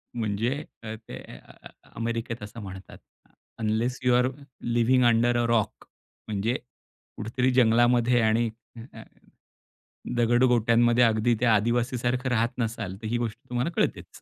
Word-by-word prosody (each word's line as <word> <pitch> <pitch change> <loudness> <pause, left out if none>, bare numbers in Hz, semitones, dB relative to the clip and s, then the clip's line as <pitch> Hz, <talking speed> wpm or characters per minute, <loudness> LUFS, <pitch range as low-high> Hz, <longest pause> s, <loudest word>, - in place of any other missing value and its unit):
म्हणजे 110 0 -1 0.3
अ, 110 0 -5
ते 110 0 -10
अ - - -12
अ - - -14
अ - - -21 0.3
अमेरिकेत 115 0 -3
असं 105 +3 -9
म्हणतात, 95 -2 -10 0.6
"unless 110 +3 -1
you 125 - +4
R 125 +1 +3 0.5
living 125 +2 +3
under 120 +1 +3
a 120 - +1
rock." 115 -3 0 0.4
म्हणजे, 110 +3 -1 0.6
कुठेतरी 125 +4 0
जंगलामध्ये 120 0 +4
आणि 115 +1 +2 0.3
अ, - - -8 0.2
अ, - - -9 1.1
दगड 120 +1 +3
गोट्यांमध्ये 120 0 +4
अगदी 115 +1 +3
ते 125 - +3
आदिवासी 120 +3 +2
सारखं 125 +2 -1
राहत 115 -1 +1
नसाल, 110 -5 -3
तर 110 - -4
ही 120 +2 0
गोष्ट 115 -1 -3
तुम्हाला 125 +5 -1
कळतेच. - - -2
115 Hz, 150 wpm, -26 LUFS, 110-120 Hz, 1.1 s, you